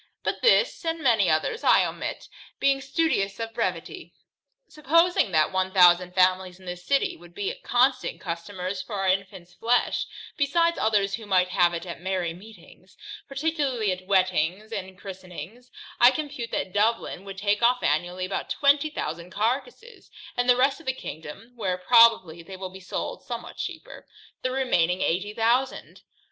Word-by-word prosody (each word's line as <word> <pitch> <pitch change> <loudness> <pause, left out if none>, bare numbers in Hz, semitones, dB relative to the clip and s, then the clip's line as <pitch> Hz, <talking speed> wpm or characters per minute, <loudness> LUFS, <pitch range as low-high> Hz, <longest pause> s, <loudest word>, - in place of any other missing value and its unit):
But - - -2
this, 485 -3 +3
and 330 0 -2
many 220 -7 +3
others, 155 - 0
I - - +5
omit, - - -5 0.3
being 275 0 +2
studious 270 -9 0
of 225 0 -5
brevity. 205 - -4 0.5
Supposing 325 - +2
that 155 0 +2
one 190 0 0
thousand 180 -1 +5
families 185 0 +2
in 185 - -16
this 180 0 -7
city, 275 +8 +1
would 175 0 -17
be 205 -1 -2
constant 255 +2 +1
customers 185 +2 -5
for 195 -1 -4
infants 185 -2 -2
flesh, 235 +6 0 0.3
besides 335 +4 +2
others 205 -2 +1
who 220 0 -5
might 185 -2 +3
have 175 -2 +2
it 170 - -5
at 170 -1 -8
merry 185 -2 -2
meetings, 215 +5 -16 0.3
particularly 275 - -1
at 185 0 -6
weddings 185 +1 +1
and 190 -3 -6
christenings, 190 +5 -10 0.3
I 240 - +8
compute 275 -4 -4
that 185 - -3
Dublin 210 -2 0
would 195 -1 -8
take 205 +2 0
off 245 +1 +3
annually 175 +5 0
about 190 - -4
twenty 285 +1 +3
thousand 170 - -5
carcasses; 275 - -3 0.3
and 245 0 0
the 245 - +6
rest 270 +3 +2
of 325 - -16
the 260 - +1
kingdom 160 - -9
(where 190 -6 -2
probably 225 -5 +5
they 185 +3 -10
will 185 -1 -6
be 190 - -11
sold 185 - -5
somewhat - - -7
cheaper) - - -7 0.3
the 255 - -1
remaining 185 -10 +1
eighty 190 +5 -1
thousand. 245 +4 0
200 Hz, 160 wpm, -25 LUFS, 180-250 Hz, 0.5 s, I